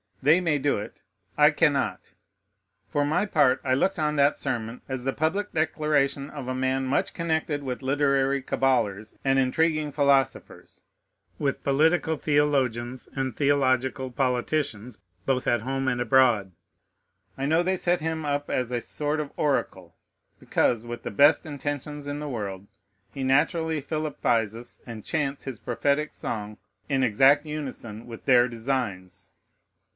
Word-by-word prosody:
They 155 +6 +5
may 165 -4 +1
do 145 +1 +1
it: 105 - -9 0.4
I - - +7
cannot. - - 0 0.7
For 145 0 0
my 175 +8 +1
part, 145 -8 +3
I 130 - +1
looked 190 +7 0
on 150 -1 0
that 140 0 +3
sermon 115 +1 -3
as 130 -2 -3
the 135 +1 -1
public 180 +8 -1
declaration 150 -3 0
of 140 -4 -7
a 130 - -2
man 130 +1 0
much 130 +2 0
connected 160 -3 -1
with 130 -1 -4
literary 140 0 +1
caballers 110 -6 0
and 135 0 +2
intriguing 155 +3 +1
philosophers, 140 -2 0 0.6
with 140 -2 -2
political 160 +3 +2
theologians 130 -5 0
and 130 -4 -2
theological 130 -2 +1
politicians, 125 -2 -1 0.3
both 130 -2 0
at 120 - +2
home 135 +2 -2
and 125 -1 0
abroad. 120 -5 +3 0.9
I 135 - -2
know 160 +4 +3
they 185 +1 0
set 175 -1 +1
him 160 0 -2
up 145 0 -2
as 125 -1 -1
a 120 -1 -1
sort 150 +4 -2
of 150 -2 -4
oracle; 95 - -1 0.4
because, 115 -2 +1
with 120 0 -6
the - - -4
best 145 - +5
intentions 145 0 -5
in 145 0 -4
the 150 -1 -5
world, 100 -5 -5 0.4
he 135 - -5
naturally 160 +3 +1
philippizes, 120 -7 -2
and 115 -3 -9
chants 145 -3 -2
his 130 -5 -5
prophetic 140 +5 -1
song 105 -1 -5 0.3
in 135 -2 +1
exact 135 +6 +4
unison 130 -7 -6
with 115 -1 -10
their 125 -1 +5
designs. 115 -6 -4
135 Hz, 145 wpm, -26 LUFS, 125-150 Hz, 0.9 s, I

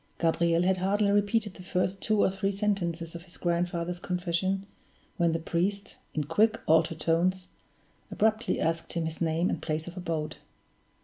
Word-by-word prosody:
Gabriel 170 +1 +2
had 185 +1 +3
hardly 200 +2 +2
repeated 205 0 +1
the 185 - -11
first 185 +1 -1
two 215 -2 +2
or - - +3
three 195 +1 -1
sentences 180 -5 -1
of 170 - -7
his 175 0 -9
grandfather's 175 0 -1
confession, 180 +2 -1 0.5
when 170 -3 +3
the 165 - +1
priest, 185 +5 -2 0.2
in 155 - +1
quick, 215 +9 +2
altered 160 0 +3
tones, 180 +3 +1 0.6
abruptly 220 +1 +1
asked 165 +1 -1
him 170 -1 -1
his 160 +1 -5
name 165 +2 +1
and - - -2
place 155 +1 -2
of 175 - -8
abode. 165 -4 -3
175 Hz, 165 wpm, -29 LUFS, 165-195 Hz, 0.6 s, had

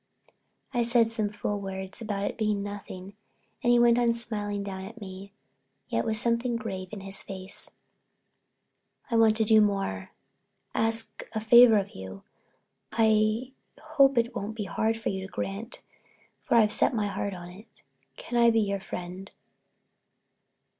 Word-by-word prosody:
I 240 - +1
said 235 -1 +3
some 215 -3 0
fool 205 0 -3
words 190 +2 -5
about 205 -3 -3
its - - -17
being 210 -2 0
nothing 200 -1 -8 0.5
and 240 - +3
he 240 - +6
went 240 0 +5
on 235 -1 +3
smiling 205 -3 -2
down 190 -1 -6
at 225 +4 -10
me, 195 -1 -9 0.6
yet - - 0
with 220 -1 0
something 235 +2 +1
grave 195 -5 -4
in 210 -2 -7
his 195 0 -5
face. 190 0 -7 1.4
"I - - +1
want 220 -1 +5
to 225 - +3
do 220 0 +6
more—ask 205 - -3
a 220 - -1
favor 230 +1 +7
of 200 -1 -1
you. 95 0 -9 0.7
I 220 +2 +2 0.3
hope 275 -2 +3
it 235 +1 +1
won't 215 0 -4
be 215 - -3
hard 220 +4 0
to 190 -3 -3
grant 200 +4 -5 0.6
for - - 0
I've 215 -2 +5
set - - +3
my 215 -2 0
heart 200 -1 -3
on 175 -1 -9
it. 205 +5 -16 0.3
Can 240 0 -1
I 235 - +7
be 225 -1 +3
your 200 -1 -1
friend?" 185 +1 -7
215 Hz, 155 wpm, -28 LUFS, 195-230 Hz, 1.4 s, favor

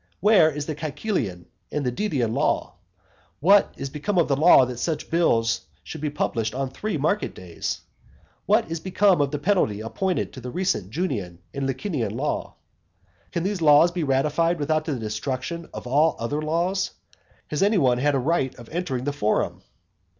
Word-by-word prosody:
Where 200 -6 +6
is 150 -1 -4
the 155 - -3
Caecilian 145 - -3 0.3
and 145 -2 -2
Didian 125 - -1
law? - - 0 0.7
What 195 +6 +5
is 135 - -5
become 170 +7 -2
of 170 - +4
the 140 - +2
law 145 -2 +7
that 125 -1 -6
such 160 +4 -3
bills 115 -9 +2 0.2
should 160 - -8
be 150 - -1
published 115 -6 -2
on 135 -1 -2
three 210 +1 -3
market 160 +9 0
days? 90 -2 -5 0.7
What - - +3
is 165 - -2
become 190 -1 +3
of 140 - +1
the 150 - -3
penalty 145 - +1
appointed 180 - -2
by 130 - -9
the 125 - -6
recent 180 - -1
Junian 110 - -3 0.2
and 140 -1 -2
Licinian 130 - -2
law? 150 +3 -2 0.8
Can 170 - -2
these 195 -1 -2
laws 155 +2 +6
be 175 -1 -2
ratified 150 +5 +1
without 155 +1 0
the 150 - -1
destruction 130 +9 -4
of - - -8
all 150 +6 +3
other 145 +6 -2
laws? 175 +5 0 0.6
Has 150 - -2
any 205 +2 +4
one 125 -6 +3
had 145 +2 +2
a - - +2
right 135 -1 0
of 120 -2 -13
entering 155 -7 -2
the 145 +1 -1
forum? 110 -7 0
150 Hz, 175 wpm, -24 LUFS, 125-170 Hz, 0.8 s, law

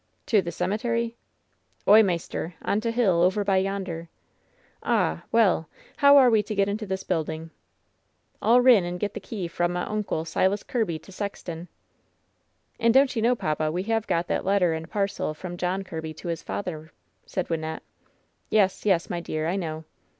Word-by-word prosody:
*' - - -44
"To 215 -3 +5
the 170 -1 -5
cemetery 230 +6 -1 0.4
?'' - - -41
"Oy, 215 +2 +9
maister, 175 -3 -2
on 205 - 0
t' 230 - -1
hill, 215 -8 +2
over 190 +4 +3
by 195 -1 +2
yonder." 190 -4 -2 0.7
"Ah! 80 +1 0
well! 195 -9 +3 0.3
how 280 0 +7
are 255 -3 +7
we 220 -2 +4
to 215 0 -5
get 200 0 +2
into 210 +1 -3
this 190 0 -3
building?" 160 -2 -3 0.9
"I'll 240 +3 +5
rin 245 -6 +6
and 175 +1 -4
get 205 +1 -2
the - - -5
key 200 -2 -5
f 170 - -10
ra' 175 - +4
m' 175 0 -3
oncle, 200 -4 -2
Silas 190 +5 +1
Kirby, 215 -10 -1
i - - -12
sexton." 180 -4 -6 1.1
"And 230 0 +3
don't 270 -1 +5
you 225 - 0
know, 240 +3 +3
papa, 155 -6 -1
we 180 +3 -2
have 225 +1 -1
got 170 +1 +1
that - - -1
letter 190 -3 +2
and 160 +1 -5
parcel 200 -6 -2
from 175 +2 -7
John 180 +2 -2
Kirby 160 -4 -6
to 175 - -7
his 165 -1 -3
father 160 -5 -5 0.2
?" - - -44
said 185 -2 -3
Wyn 165 -1 0
nette. 160 0 -5 0.7
"Yes, 205 -1 +2
yes, 180 -4 +3
my 175 - -3
dear, 155 -2 -3
I 175 - 0
know." 160 -4 -4
190 Hz, 195 wpm, -26 LUFS, 170-215 Hz, 1.1 s, Oy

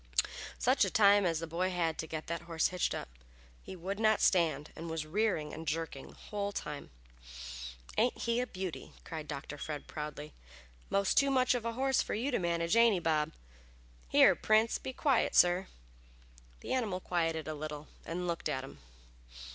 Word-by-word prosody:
Such - - +3
a - - +2
time 200 -2 +5
as 165 -1 +1
the - - -2
boy 170 +3 -1
had 170 -3 -1
to 160 - -3
get 155 -1 -5
that 170 -1 -3
horse 165 -1 +2
hitched 180 -1 0
up. - - -5 0.5
He - - -9
would 190 +4 -4
not 220 -1 +4
stand, 160 -5 +2
and 165 +1 -6
was 160 -1 -3
rearing 170 -3 0
and 160 0 -7
jerking 160 -3 -3
the - - -15
whole 205 -1 -4
time. 150 -7 -5 1.1
"Ain't 240 +3 +2
he 235 0 0
a 250 - -1
beauty?" 185 -5 -6
cried 155 -2 -6
Dr. 145 0 -6
Fred, 150 -1 -5
proudly. 150 0 -6 0.6
"Most 200 -1 +1
too 275 - +5
much 255 -2 +3
of 240 -2 -2
a 230 - -1
horse 265 +2 +2
for - - -3
you 250 +7 -1
to - - +1
manage, 170 +1 +1
ain't 230 -1 +6
he, - - 0
Bob? 160 -2 +1 0.8
Here, - - +7
Prince, 220 +1 +3
be 265 - -5
quiet, 265 -1 +1
sir!" 180 +2 +5 0.9
The - - -3
animal 220 -8 0
quieted 165 -3 -1
a 155 - -2
little 150 0 -6 0.2
and 180 +2 -4
looked 170 -2 -2
at 130 -3 -2
him. 135 - -11
170 Hz, 185 wpm, -32 LUFS, 155-215 Hz, 1.1 s, Here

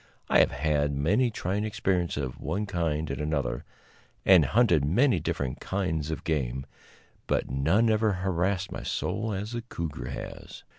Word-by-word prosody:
I - - +5
have - - +5
had 75 0 0
many 100 - +2
trying 100 -1 -2
experiences 90 -7 0
of 65 -2 -5
one 105 +2 -2
kind 80 -5 -1
and - - -3
another, 70 -5 -1 0.6
and 90 -6 +7
hunted 90 - +3
many 100 - +3
different 70 -4 -2
kinds 80 -6 -2
of 80 - -4
game, 65 -4 -1 0.6
but - - 0
none 80 - +3
ever 110 -1 +3
harassed 95 0 -1
my - - -5
soul 110 +1 -2
as 105 +2 -3
the 120 0 -3
cougar 85 - -5
has. 70 - -8
85 Hz, 155 wpm, -28 LUFS, 75-105 Hz, 0.6 s, and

